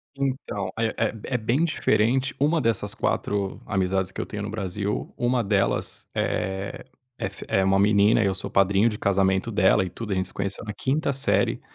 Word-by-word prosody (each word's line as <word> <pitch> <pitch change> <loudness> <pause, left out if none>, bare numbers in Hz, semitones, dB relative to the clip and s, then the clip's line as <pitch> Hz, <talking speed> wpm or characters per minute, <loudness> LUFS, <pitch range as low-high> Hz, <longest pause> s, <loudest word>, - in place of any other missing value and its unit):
Então, 135 -7 -3
é 115 -1 +2
é 115 - +1
é 125 - -1
bem 125 +9 +1
diferente. 130 -4 +1
Uma 155 +3 +2
dessas 110 -3 0
4 100 -3 -1
amizades 95 -2 0
que - - -6
eu - - -2
tenho 105 -1 -5
no 105 - -4
Brasil, 100 -1 -3
1 120 0 +1
delas 100 -1 0
eh, 95 +1 -2 0.3
é - - -2
f 100 +1 -8 0.2
uma 95 0 +3
menina, 105 +2 +4
e - - +2
eu 95 - +1
sou 95 - -4
padrinho 100 +3 +3
de 105 - -6
casamento 95 +2 +1
dela 95 -1 +3
e 90 - -5
tudo. 105 +3 -6
A - - 0
gente 95 0 0
se - - -13
conheceu 100 0 -3
na 105 -2 -5
5ª 140 +6 0
série 135 +2 +2
105 Hz, 195 wpm, -25 LUFS, 95-115 Hz, 0.3 s, menina